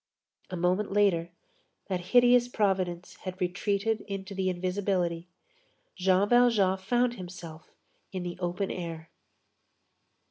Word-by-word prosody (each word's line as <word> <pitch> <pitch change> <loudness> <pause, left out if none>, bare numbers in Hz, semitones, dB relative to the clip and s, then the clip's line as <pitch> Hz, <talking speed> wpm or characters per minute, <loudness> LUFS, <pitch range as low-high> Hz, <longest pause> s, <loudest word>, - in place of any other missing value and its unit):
A 185 - -4
moment 180 +4 +1
later, 195 -5 +2 0.6
that 185 -2 -2
hideous 245 0 +6
providence 185 -6 -1
had 185 -1 -7
retreated 200 +4 0
into 195 0 -5
the 190 -1 0
invisibility. 180 -2 -1 0.7
Jean 190 +1 +3
Valjean 220 -6 +4
found 240 +5 +1
himself 175 -3 -9 0.4
in 185 -2 -4
the 175 0 -6
open 180 +2 -2
air. 165 -2 -6
185 Hz, 110 wpm, -29 LUFS, 180-205 Hz, 0.7 s, hideous